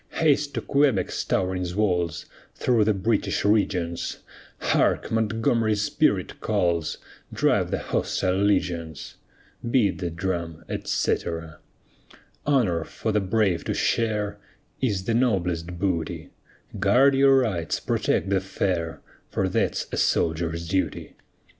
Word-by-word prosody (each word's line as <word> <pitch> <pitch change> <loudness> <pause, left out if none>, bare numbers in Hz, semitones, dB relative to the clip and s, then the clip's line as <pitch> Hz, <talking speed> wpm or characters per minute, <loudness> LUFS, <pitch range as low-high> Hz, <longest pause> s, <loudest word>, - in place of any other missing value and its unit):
Haste 150 -2 +2
to - - -1
Quebec's 140 -8 +1
towering 90 0 0
walls, 90 -7 0 0.3
Through 115 -4 +2
the 110 - +3
British 100 0 0
regions; 90 -5 0 0.4
Hark! - - +1
Montgomery's 110 -1 +1
spirit - - 0
calls, 85 -3 0 0.3
Drive - - +2
the - - 0
hostile 90 - -1
legions. 85 -6 -1 0.5
Beat 105 -8 +2
the 90 -2 -2
drum, 85 -1 -4
etc. 80 -2 -2 0.9
Honor 110 - +2
for 110 - -4
the 105 0 +2
brave 95 -2 +1
to - - -1
share 105 -3 0 0.4
Is 105 -8 0
the 115 - -1
noblest 90 -8 0
booty; 85 -4 -2 0.5
Guard 125 +8 +5
your 135 0 +5
rights, 100 -11 0
protect 100 - 0
the 95 -1 +2
fair, 90 -4 -2 0.3
For - - 0
that's - - 0
a - - -3
soldier's 85 0 0
duty. 95 +2 -2
95 Hz, 115 wpm, -25 LUFS, 85-110 Hz, 0.9 s, Guard